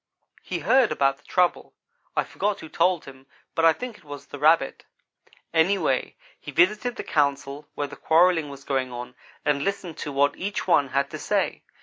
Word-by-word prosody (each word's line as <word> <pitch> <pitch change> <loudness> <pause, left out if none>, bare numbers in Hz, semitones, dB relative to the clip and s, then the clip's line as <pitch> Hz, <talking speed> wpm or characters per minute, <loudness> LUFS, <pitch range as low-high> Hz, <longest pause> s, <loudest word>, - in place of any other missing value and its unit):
"He 180 - -4
heard 240 - +4
about 135 0 +2
the 150 - -27
trouble. 180 -1 0 0.4
I - - +2
forget 205 0 -2
who 160 - -9
told 175 0 +1
him, 135 0 -13 0.3
but 165 - +2
I 165 - +8
think 235 +6 -6
it - - -23
was 145 -1 -9
the 145 - -9
Rabbit. 155 -2 +3 0.7
Anyhow 175 +5 +3 0.4
he - - -9
visited 210 +7 +2
the - - -5
council 140 -1 -1
where 145 - -1
the - - -9
quarrelling 165 -2 +3
was 140 -1 -10
going 130 -2 -1
on 120 0 -7 0.3
and 145 -1 +1
listened 190 -4 -3
to 145 - -4
what 140 +1 +2
each 200 +2 -3
one 145 -6 +4
had 140 +1 -1
to - - -6
say. - - -1
155 Hz, 190 wpm, -25 LUFS, 140-185 Hz, 0.7 s, I